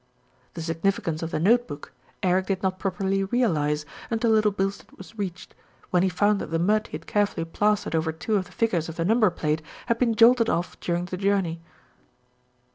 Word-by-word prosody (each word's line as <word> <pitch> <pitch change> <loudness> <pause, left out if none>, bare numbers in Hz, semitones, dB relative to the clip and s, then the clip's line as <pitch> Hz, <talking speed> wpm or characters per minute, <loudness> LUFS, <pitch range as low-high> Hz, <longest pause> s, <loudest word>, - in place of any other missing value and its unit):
The 165 - -5
significance 165 -1 -1
of 165 - -3
the - - -2
note 235 +8 +3
book, 145 0 -9 0.3
Eric 185 0 +2
did 195 -1 -2
not 190 0 -1
prop 190 -2 -2
erly 195 0 0
realise 150 -11 +1 0.2
until 225 0 +1
Little 215 -1 +4
Bilstead 195 0 -3
was 190 +4 -12
reached, 190 -4 -5 0.4
when 180 - +3
he 190 - +2
found 205 +3 +2
that - - -5
the 165 - 0
mud 210 +6 +2
he - - -5
had 165 - -19
carefully 205 -5 0
plastered 210 +4 0
over 160 0 +1
two 175 +7 -2
of 190 -2 +1
the 180 - -16
figures 185 -8 0
of 160 - -7
the 165 - -1
number 220 +1 +4
plate 155 -2 -1 0.2
had 235 -1 0
been 235 -3 +2
jolted 230 0 +6
off 175 +1 -2
during 175 0 -1
the 185 0 -5
journey. 190 -4 0
190 Hz, 200 wpm, -25 LUFS, 165-210 Hz, 0.4 s, jolted